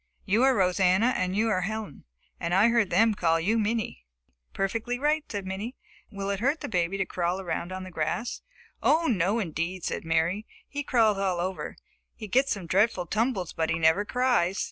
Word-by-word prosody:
You 215 Hz, +5 st, +2 dB
are 265 Hz, 0 st, +5 dB
Rosanna 190 Hz, +5 st, +3 dB
and 185 Hz, +1 st, -1 dB
you 220 Hz, +2 st, +2 dB
are 185 Hz, -4 st, +1 dB
Helen, 215 Hz, -4 st, -5 dB, 0.3 s
and 170 Hz, +1 st, -1 dB
I 205 Hz, +5 st, +5 dB
heard 230 Hz, -4 st, +2 dB
them 220 Hz, +5 st, +4 dB
call 165 Hz, -4 st, +2 dB
you 215 Hz, +7 st, +1 dB
Minnie." 215 Hz, -, -2 dB, 0.5 s
"Perfectly 230 Hz, +5 st, -2 dB
right," 300 Hz, +3 st, +1 dB
said 200 Hz, -2 st, -4 dB
Minnie. 200 Hz, +7 st, -5 dB, 0.4 s
"Will 200 Hz, 0 st, -3 dB
it 200 Hz, -, -2 dB
hurt 275 Hz, +7 st, 0 dB
the -, -, -4 dB
baby 180 Hz, -1 st, 0 dB
to 195 Hz, -, 0 dB
crawl 175 Hz, +1 st, -1 dB
around 175 Hz, -1 st, -3 dB
on 185 Hz, 0 st, -5 dB
the 185 Hz, -, -9 dB
grass?" 160 Hz, +9 st, -2 dB, 0.4 s
"Oh, 325 Hz, +2 st, +3 dB
no, 200 Hz, -, +1 dB
indeed," 175 Hz, -2 st, -3 dB
said -, -, -3 dB
Mary. 165 Hz, +6 st, 0 dB, 0.2 s
"He 285 Hz, -, -4 dB
crawls 225 Hz, -7 st, +2 dB
all 185 Hz, -3 st, 0 dB
over. 185 Hz, +2 st, -3 dB, 0.4 s
He 215 Hz, -, -8 dB
gets 265 Hz, +7 st, +2 dB
some 195 Hz, -4 st, -2 dB
dreadful 185 Hz, +1 st, +2 dB
tumbles 215 Hz, -2 st, -1 dB
but 160 Hz, -1 st, -1 dB
he 165 Hz, -, +1 dB
never 160 Hz, +5 st, +3 dB
cries. 235 Hz, -6 st, +1 dB
195 Hz, 190 wpm, -27 LUFS, 180-230 Hz, 0.5 s, are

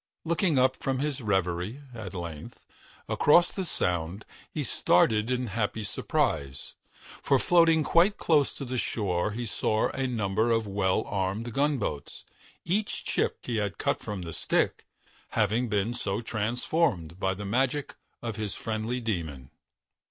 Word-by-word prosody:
Looking 170 Hz, -2 st, +2 dB
up 130 Hz, 0 st, +4 dB
from 135 Hz, -1 st, -1 dB
his 140 Hz, 0 st, -1 dB
reverie, 95 Hz, +4 st, -1 dB
at 105 Hz, -5 st, -7 dB
length, 85 Hz, -4 st, -7 dB, 0.4 s
across 170 Hz, +4 st, +5 dB
the 190 Hz, -, -3 dB
Sound, 90 Hz, -, -1 dB, 0.3 s
he -, -, -2 dB
started 105 Hz, +5 st, +3 dB
in 125 Hz, 0 st, 0 dB
happy 110 Hz, 0 st, -2 dB
surprise, 70 Hz, -8 st, -1 dB, 0.5 s
for 135 Hz, -, +3 dB
floating 165 Hz, +1 st, +4 dB
quite 175 Hz, +7 st, +4 dB
close 150 Hz, -4 st, +3 dB
to 140 Hz, -, -5 dB
the 130 Hz, 0 st, -2 dB
shore 95 Hz, -6 st, 0 dB
he 120 Hz, +3 st, -4 dB
saw 110 Hz, 0 st, +1 dB
a 135 Hz, 0 st, -2 dB
number 110 Hz, -1 st, 0 dB
of 115 Hz, -1 st, +2 dB
well 100 Hz, 0 st, +1 dB
armed 100 Hz, +4 st, -2 dB
gunboats; 135 Hz, -, -1 dB, 0.4 s
each 200 Hz, +5 st, -1 dB
chip -, -, 0 dB
that -, -, -5 dB
he 115 Hz, -, 0 dB
had 105 Hz, -3 st, -1 dB
cut -, -, 0 dB
from 100 Hz, -3 st, -5 dB
the 85 Hz, -1 st, -6 dB
stick 80 Hz, -, 0 dB, 0.5 s
having 110 Hz, +3 st, +2 dB
been 105 Hz, +2 st, 0 dB
so 105 Hz, -4 st, -2 dB
transformed 110 Hz, -, -1 dB
by 95 Hz, 0 st, 0 dB
the 105 Hz, +2 st, -6 dB
magic 135 Hz, +7 st, 0 dB, 0.3 s
of 115 Hz, -2 st, -3 dB
his 105 Hz, -2 st, -3 dB
friendly 110 Hz, +3 st, -2 dB
demon. 80 Hz, -, -4 dB
110 Hz, 150 wpm, -28 LUFS, 95-130 Hz, 0.5 s, across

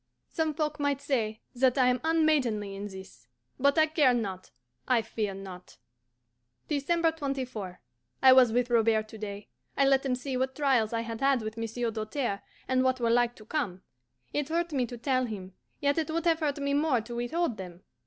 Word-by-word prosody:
Some 315 Hz, -2 st, -1 dB
folk 305 Hz, -1 st, -2 dB
might 285 Hz, -1 st, 0 dB
say 225 Hz, -6 st, -1 dB
that 255 Hz, +1 st, +2 dB
I 255 Hz, -, +5 dB
am 250 Hz, 0 st, +2 dB
unmaidenly 290 Hz, -11 st, +2 dB
in 200 Hz, +1 st, -5 dB
this. 190 Hz, -11 st, -12 dB, 0.3 s
But 280 Hz, +3 st, +3 dB
I 315 Hz, -, +6 dB
care 300 Hz, -5 st, +3 dB
not, 195 Hz, -5 st, -4 dB, 0.4 s
I 245 Hz, -3 st, +3 dB
fear 215 Hz, -3 st, -3 dB
not. 190 Hz, -2 st, -10 dB, 0.9 s
December 325 Hz, +3 st, +1 dB
24. 260 Hz, -, -4 dB, 0.4 s
I 260 Hz, -1 st, +9 dB
was 255 Hz, -3 st, +6 dB
with 245 Hz, +1 st, 0 dB
Robert 225 Hz, -2 st, +3 dB
to 220 Hz, -, -10 dB
day. 205 Hz, -1 st, -6 dB, 0.3 s
I 275 Hz, -, +4 dB
let 270 Hz, 0 st, +4 dB
him 260 Hz, -2 st, 0 dB
see 255 Hz, +1 st, -4 dB
what 260 Hz, +1 st, -1 dB
trials 260 Hz, -7 st, +2 dB
I 230 Hz, -1 st, -1 dB
had 230 Hz, -1 st, -6 dB
had 270 Hz, -4 st, +3 dB
with 215 Hz, 0 st, -5 dB
Monsieur 230 Hz, +1 st, -2 dB
Doltaire, 215 Hz, 0 st, -3 dB, 0.3 s
and 260 Hz, 0 st, +2 dB
what 260 Hz, 0 st, +1 dB
were 235 Hz, -1 st, +1 dB
like 240 Hz, 0 st, +2 dB
to 215 Hz, -, -14 dB
come. 205 Hz, -, -3 dB, 0.5 s
It 295 Hz, 0 st, -1 dB
hurt 335 Hz, 0 st, -1 dB
me 255 Hz, -3 st, +1 dB
to 245 Hz, -, -8 dB
tell 255 Hz, +2 st, +1 dB
him, 195 Hz, -5 st, -7 dB, 0.3 s
yet 285 Hz, +1 st, +1 dB
it 320 Hz, -, -2 dB
would 330 Hz, +1 st, -2 dB
have 330 Hz, -1 st, +3 dB
hurt 295 Hz, -3 st, -1 dB
me 280 Hz, 0 st, -1 dB
more 285 Hz, -4 st, +2 dB
to 235 Hz, +2 st, -9 dB
withhold 245 Hz, +1 st, -1 dB
them. 180 Hz, -1 st, -9 dB
250 Hz, 195 wpm, -29 LUFS, 220-285 Hz, 0.9 s, I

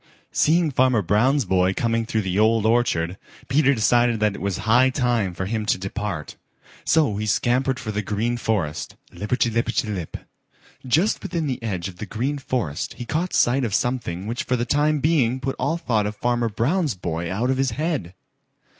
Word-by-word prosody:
Seeing 160 Hz, 0 st, +3 dB
Farmer 125 Hz, -4 st, +3 dB
Brown's 120 Hz, -, +2 dB
boy 95 Hz, 0 st, +2 dB
coming 115 Hz, -1 st, 0 dB
through 110 Hz, -2 st, 0 dB
the 95 Hz, +1 st, -1 dB
Old 110 Hz, 0 st, +3 dB
Orchard 95 Hz, -7 st, +1 dB, 0.3 s
Peter 140 Hz, 0 st, +3 dB
decided 120 Hz, +1 st, +3 dB
that 105 Hz, -1 st, +2 dB
it -, -, -8 dB
was 100 Hz, -1 st, -1 dB
high 125 Hz, +4 st, +5 dB
time 120 Hz, -8 st, 0 dB
for 95 Hz, -, -3 dB
him 110 Hz, +2 st, -2 dB
to -, -, +2 dB
depart. 95 Hz, -3 st, -5 dB, 0.5 s
So 145 Hz, -11 st, +2 dB
he 110 Hz, +1 st, -3 dB
scampered 130 Hz, +5 st, +1 dB
for 110 Hz, -3 st, -4 dB
the 105 Hz, 0 st, -2 dB
Green 110 Hz, +4 st, -1 dB
Forest, 95 Hz, -10 st, -2 dB, 0.2 s
lipperty 115 Hz, +3 st, 0 dB
lipperty 115 Hz, -1 st, 0 dB
lip. 90 Hz, -5 st, -5 dB, 0.7 s
Just 165 Hz, -, +2 dB
within 165 Hz, -2 st, -2 dB
the 130 Hz, -4 st, -3 dB
edge 95 Hz, -6 st, -3 dB
of 90 Hz, -2 st, -10 dB
the 105 Hz, -, -6 dB
Green 135 Hz, +6 st, -2 dB
Forest 115 Hz, -, -3 dB
he 120 Hz, -, -7 dB
caught 165 Hz, +8 st, -1 dB
sight 130 Hz, +3 st, +2 dB
of 105 Hz, -5 st, 0 dB
something 115 Hz, -8 st, -2 dB
which 115 Hz, +3 st, -3 dB
for 125 Hz, -, 0 dB
the 120 Hz, -1 st, -1 dB
time 150 Hz, +2 st, +1 dB
being 130 Hz, -5 st, +2 dB
put 135 Hz, +1 st, -3 dB
all 140 Hz, +6 st, 0 dB
thought 110 Hz, -10 st, 0 dB
of 105 Hz, -, -5 dB
Farmer 120 Hz, +1 st, 0 dB
Brown's 140 Hz, -, 0 dB
boy 85 Hz, -1 st, -4 dB
out 120 Hz, +7 st, 0 dB
of 130 Hz, -, 0 dB
his 135 Hz, 0 st, +1 dB
head. 145 Hz, -, -2 dB
115 Hz, 190 wpm, -23 LUFS, 105-130 Hz, 0.7 s, high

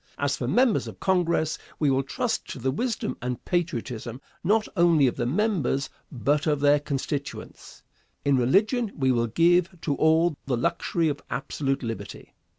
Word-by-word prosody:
As 140 Hz, -1 st, 0 dB
for 120 Hz, -, -4 dB
members 245 Hz, -, +2 dB
of -, -, -9 dB
Congress, 170 Hz, -4 st, +1 dB, 0.2 s
we 150 Hz, -3 st, +2 dB
will 135 Hz, 0 st, +2 dB
trust 220 Hz, -, -2 dB
to -, -, -6 dB
the 130 Hz, +1 st, -1 dB
wisdom 230 Hz, -, -2 dB
and 125 Hz, 0 st, -4 dB
patriotism, 125 Hz, -9 st, -2 dB, 0.2 s
not 215 Hz, +4 st, +2 dB
only 170 Hz, -5 st, +4 dB
of 125 Hz, -, +1 dB
the 120 Hz, -, -1 dB
members, 155 Hz, -, 0 dB, 0.2 s
but 145 Hz, +4 st, 0 dB
of 150 Hz, -2 st, +2 dB
their 145 Hz, +1 st, +4 dB
constituents. 140 Hz, 0 st, -5 dB, 0.4 s
In 140 Hz, -1 st, +4 dB
religion 205 Hz, -, +2 dB
we 130 Hz, -2 st, +2 dB
will 120 Hz, -1 st, +1 dB
give 175 Hz, -, +2 dB
to 145 Hz, -, 0 dB
all 160 Hz, +2 st, +3 dB
the 125 Hz, -3 st, 0 dB
luxury 165 Hz, +7 st, 0 dB
of 145 Hz, -2 st, -2 dB
absolute 135 Hz, 0 st, -2 dB
liberty. 115 Hz, -1 st, -7 dB
145 Hz, 160 wpm, -26 LUFS, 130-175 Hz, 0.4 s, only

